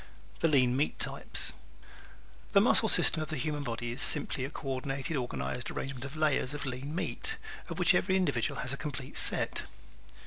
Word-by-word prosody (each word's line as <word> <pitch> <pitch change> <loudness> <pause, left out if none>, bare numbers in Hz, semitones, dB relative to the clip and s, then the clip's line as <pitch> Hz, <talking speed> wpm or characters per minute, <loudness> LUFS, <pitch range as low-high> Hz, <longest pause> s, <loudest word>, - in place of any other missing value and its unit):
The - - +1
"Lean 130 -5 +2
Meat" 145 +3 -1
Type - - -3
¶ - - +5 1.0
The 200 - +6
muscle 220 +1 +3
system 160 - +7
of 155 - -6
the 155 - -4
human 145 +3 -3
body 120 -2 -5
is 120 - -1
simply 140 -3 +4
a - - -6
co 145 -1 -10
ordinated, 135 +4 -4
organized 125 -1 -4
arrangement 135 -1 -6
of 135 +2 -9
layers 150 -2 0
of 145 - -6
lean 135 +4 -6
meat, 445 - -4 0.3
of - - -6
which - - +3
every 190 0 0
individual 145 -11 -1
has 130 - -1
a - - -5
complete 140 -3 -7
set. - - +3
140 Hz, 185 wpm, -29 LUFS, 130-155 Hz, 1.0 s, system